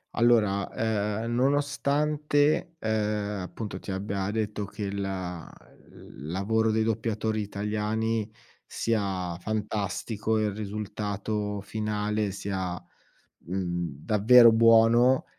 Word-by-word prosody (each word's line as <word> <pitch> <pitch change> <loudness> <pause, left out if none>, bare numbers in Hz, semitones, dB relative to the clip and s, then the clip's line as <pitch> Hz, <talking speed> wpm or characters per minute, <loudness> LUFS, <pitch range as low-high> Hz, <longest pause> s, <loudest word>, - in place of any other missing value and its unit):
Allora, 110 -5 +3 0.5
ehm, 115 0 -3
nonostante, 145 +4 +1
uhm, 110 - -2 0.5
appunto, 105 +3 -6
ti - - -11
abbia 95 0 -2
detto 105 -1 -2
che 105 +2 -7
il 100 0 -3
l 90 -6 -8
lavoro 110 +5 +1
dei 110 0 +2
doppiatori 110 0 -1
italiani 105 +2 -2 0.3
sia 95 -6 -2
fantastico, 110 +1 -2
il 105 -1 0
risultato 105 0 -3
finale 105 0 -2
sia, 95 -2 -3 0.7
mhmm, 85 -4 -3
davvero 115 +3 +7
buono, 115 +3 +5
105 Hz, 95 wpm, -27 LUFS, 100-115 Hz, 0.7 s, davvero